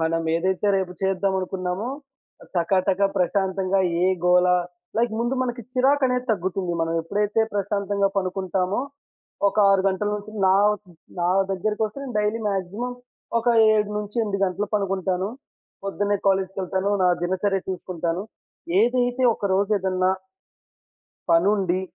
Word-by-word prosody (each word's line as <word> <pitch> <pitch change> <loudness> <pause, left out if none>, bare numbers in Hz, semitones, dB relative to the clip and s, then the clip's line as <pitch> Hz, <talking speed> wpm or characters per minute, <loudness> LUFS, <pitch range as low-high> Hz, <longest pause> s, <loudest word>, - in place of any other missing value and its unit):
మనం 165 +1 0
ఏదైతే 190 +4 0
రేపు 190 -2 -2
చేద్దాం 195 0 +1
అనుకున్నామో 185 +3 -3 0.7
టకాటకా 185 +3 +2
ప్రశాంతంగా 190 0 +1 0.2
ఏ‌గోల 180 -1 +3 0.5
లైక్ 235 0 +1
ముందు 240 +3 0
మనకి 245 -1 -3
చిరాకనేది 255 -1 +2
తగ్గుతుంది. 185 -2 -1
మనం 165 0 0
ఎప్పుడైతే 210 +5 0
ప్రశాంతంగా 200 0 0
పనుకుంటామో, 185 +1 -1 0.7
ఒక 200 - -7
6 195 -1 +4
గంటల 195 +2 -1
నుంచి 210 +1 -9
నా 190 - +5 0.7
నా 175 - +2 0.2
దగ్గరకొస్తే 210 +5 -2
నేను 265 -3 -6
డైలీ 210 +2 0
మాక్సిమం 200 +5 -3 0.5
ఒక 230 - -6 0.3
7-8 210 0 -1
గంటలు 190 +2 -1
పనుకుంటాను. 190 -2 0 0.6
పొద్దున్నే 205 +1 0
కాలేజీకెళ్తాను. 190 0 0
నా 180 - +5
దినచర్య 190 +2 0
చూసుకుంటాను. 175 -1 -3 0.6
ఏదైతే 245 +2 +1
ఒక 205 - -3
రోజు 200 +2 +1
ఏదన్నా 185 -1 +1 1.2
పనుండి. 185 +1 +3
195 Hz, 110 wpm, -24 LUFS, 185-210 Hz, 1.2 s, నా